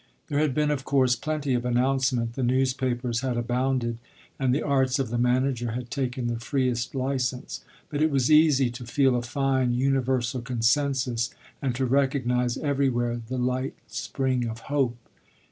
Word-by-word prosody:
There 145 - +1
had 150 -4 +1
been 150 0 +2
of 140 -2 -2
course 130 -3 +3
plenty 145 +1 -2
of 120 -1 0
announcement 125 -1 +1
the 130 - -4
newspapers 125 -1 0
had 130 -3 -1
abounded 120 0 -1 0.4
and 130 -2 +2
the 140 - +1
arts 135 -2 +2
of 135 -4 -1
the 120 - 0
manager 125 -1 +1
had 120 0 -5
taken 130 -2 -2
the 120 -1 -2
freest 125 -1 -1
license; 130 -1 -2 0.2
but 145 0 -3
it 155 - +4
was 135 -1 +1
easy 150 -5 +5
to 120 +1 -8
feel 130 0 +3
a 120 - 0
fine, 130 0 0
universal 130 -2 0
consensus 125 0 +1 0.3
and 130 -4 -1
to 130 +1 0
recognise 125 -2 +1
everywhere 125 -5 0
the 130 +2 -3
light 125 +2 -1
spring 130 -3 -2
of 115 +1 -6
hope. 130 -5 +1
130 Hz, 160 wpm, -26 LUFS, 120-135 Hz, 0.4 s, easy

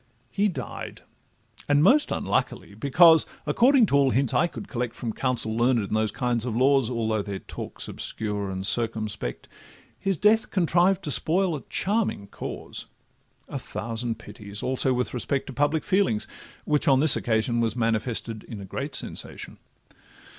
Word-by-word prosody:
He 205 +8 +2
died: 135 - -6 0.7
and 145 +1 +4
most 285 - +5
unluckily, - - -2
because, 160 +3 +5 0.2
According 245 - +4
to 140 - 0
all 140 -1 +4
hints 130 -1 +1
I 170 - +3
could 195 - -9
collect 120 -2 -3
From 115 -3 -4
counsel 125 -4 -1
learned 120 +2 +3
in 100 - -5
those 110 0 +1
kinds 120 -1 -1
of 120 -3 -3
laws 135 -1 +3
(Although 110 -3 -1
their 100 -1 -5
talk - - -9
's - - -4
obscure 105 -2 -3
and 95 0 -4
circumspect), 110 - -1 0.5
His 195 -3 -1
death 215 +6 +3
contrived 180 +1 +2
to 150 - -2
spoil 175 +6 +2
a 140 - -6
charming 200 - -1
cause; - - -7 0.6
A - - -5
thousand 115 0 -4
pities 105 -2 -9
also 130 0 +1
with 125 0 -1
respect 130 +3 -1
To 135 - -8
public 145 +3 +1
feeling, 190 - +2 0.5
which 150 -1 +1
on 135 -2 +5
this 150 -1 +6
occasion 115 +1 0
Was 115 -1 0
manifested 115 -1 -1
in 110 - -8
a 100 - -8
great 140 +9 -5
sensation. - - -6
125 Hz, 160 wpm, -25 LUFS, 110-155 Hz, 0.7 s, this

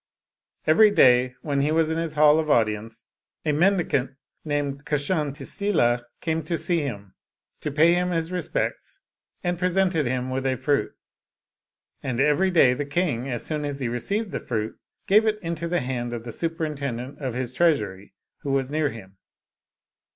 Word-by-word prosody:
Every 210 +8 +6
day, 125 -9 +4
when 140 -2 0
he 145 +2 +1
was 160 0 +2
in 160 - -1
his 165 -2 -3
hall 150 +1 +6
of 155 -1 -2
audience, 110 -2 0 0.3
a 155 - +2
mendicant 160 -5 +2 0.3
named 145 -2 -2
Kshantisila 145 - 0 0.2
came 160 -1 -1
to 170 +1 -1
him, 140 - -2 0.5
to 150 - -4
pay 160 +4 +5
him 180 +1 +1
his 165 -1 -1
respects, 180 -3 -3 0.4
and 175 -1 -1
presented 180 -5 +1
him 130 +1 -2
with 135 +1 -1
a 130 - +1
fruit. 140 +3 0 1.1
And 125 -2 -3
every 150 +7 +3
day 160 -8 +5
the 145 - -2
king, 140 -4 -1
as 120 -3 -3
soon 150 -1 -2
as 145 -1 -4
he 130 - -1
received 200 - -2
the - - -3
fruit, 110 -2 -3 0.3
gave 215 +3 +4
it 215 -1 +1
into 170 0 -3
the 175 +1 0
hand 120 -1 -3
of 115 -1 -5
the 120 - -6
superintendent 140 -6 -4
of 130 -5 -3
his 125 -1 -3
treasury 105 - 0 0.2
who 140 - -6
was 135 0 0
near 155 -1 +1
him. 100 -5 -11
145 Hz, 165 wpm, -25 LUFS, 125-165 Hz, 1.1 s, Every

